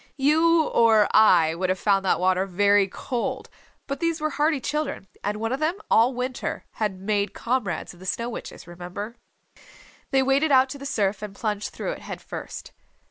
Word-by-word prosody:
You 320 +4 +4
or 225 -6 +4
I 175 -7 +6
would 185 +2 -2
have 185 - +1
found 195 0 +2
that - - +2
water 185 +1 +2
very 200 +1 +3
cold, 235 +5 -4 0.3
but 275 - -4
these 335 -1 0
were 310 0 -1
hardy 300 0 +1
children; 295 -4 -3 0.2
and 205 +1 -1
one 225 +2 -2
of 265 - -2
them 315 +3 0 0.2
all 240 +3 +4
winter 250 0 -4 0.2
had 200 -3 -1
made 200 0 -1
comrades 230 -11 -2
of 175 - -18
the 185 - -10
Snow 235 +5 -1
Witches, 235 - -8
remember. 180 +6 -7 0.9
They 270 -1 +3
waded 275 +3 +2
out 260 0 +5
to 280 - -7
the 280 - -5
surf 205 -7 0
and 210 -2 -7
plunged 210 -1 -2
through - - -4
it, - - -6
head - - -7
first. - - -8
225 Hz, 190 wpm, -25 LUFS, 195-275 Hz, 0.9 s, I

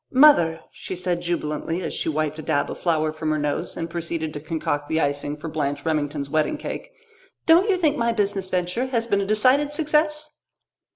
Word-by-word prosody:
"Mother," 255 - +6
she 185 - -6
said 180 -1 -2
jubilantly, 170 0 -2
as - - -3
she - - -2
wiped 155 0 -1
a - - -3
dab 145 -1 0
of - - -7
flour 155 -3 +1
from 155 0 -3
her 155 - +1
nose 145 -1 -2
and 165 - -2
proceeded 165 -2 -4
to 150 - -5
concoct 150 -2 -3
the 160 - +1
icing 145 0 -1
for 150 - -7
Blanche 145 -2 -2
Remington's 145 -2 -1
wedding 155 - 0
cake, - - -6 0.5
"don't 345 +6 +5
you 385 - +3
think 310 -4 +2
my 235 0 +2
business 200 -4 -1
venture 180 +8 -1
has 235 -3 0
been 200 -4 +1
a 195 - -2
decided 255 +8 +3
success?" 305 0 0
170 Hz, 195 wpm, -24 LUFS, 155-240 Hz, 0.5 s, Mother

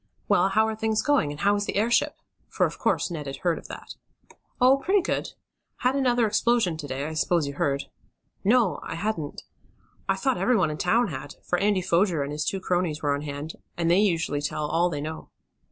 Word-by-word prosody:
Well, 180 +2 +4
how 220 +3 +3
are 220 - -2
things 220 0 0
going; 290 - +2
and 145 +1 -7
how 205 +1 +4
is 205 - -2
the - - -3
airship?" 225 +4 +2 0.3
for, - - +2
of - - -5
course, - - +1
Ned 150 -4 -5
had 135 - -4
heard 170 +2 0
of - - -13
that. - - -9 0.7
"Oh, 260 +2 +6
pretty 380 +7 +2
good. - - -2 0.5
Had 255 +2 +2
another 245 -4 +3
explosion 220 -4 +2
to 150 -2 -6
day, 135 +1 -3
I 160 - -4
s'pose 165 0 +1
you 140 - -4
heard." 140 -1 0 0.6
"No, 220 -1 +3
I - - -6
hadn't." 165 -5 -3 0.7
"I - - +3
thought 265 -3 0
everyone 195 -11 +2
in 150 - -6
town 225 +5 +2
had, 140 -1 -7
for 175 - +1
Andy 200 -2 +2
Foger 175 -3 +2
and 140 - -5
his 150 0 -2
two 195 - -1
cronies 175 -4 -1
were 145 -1 +2
on 140 - -2
hand, 145 +1 -6 0.2
and 170 -1 +1
they 180 - +5
usually 165 -7 +1
tell 150 +1 -2
all 170 +4 +2
they 145 -4 -3
know." 160 +2 -6
175 Hz, 215 wpm, -26 LUFS, 150-220 Hz, 0.7 s, Oh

